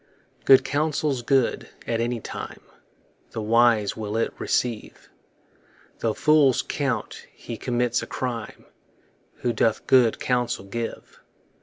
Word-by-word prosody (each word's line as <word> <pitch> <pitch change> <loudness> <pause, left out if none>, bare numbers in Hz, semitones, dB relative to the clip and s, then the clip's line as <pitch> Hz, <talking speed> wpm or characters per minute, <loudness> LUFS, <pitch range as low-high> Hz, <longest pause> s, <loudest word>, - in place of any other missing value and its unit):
Good 135 - +7
counsel's 145 -2 0
good 130 0 +1 0.2
at 115 -1 -1
any 120 0 -1
time; - - -7 0.7
The 110 - -3
wise 115 -1 +3
will 110 0 -4
it 115 - 0
receive, 120 -3 -2 0.9
Tho' 110 -2 -1
fools 150 -4 +4
count 140 -4 -3
he 120 - -8
commits 120 0 0
a - - -6
crime 120 -4 -5 0.8
Who 120 - +1
doth 110 0 +1
good 125 -4 +4
counsel 120 -5 -1
give. 115 +4 -6
120 Hz, 120 wpm, -24 LUFS, 115-130 Hz, 0.9 s, Good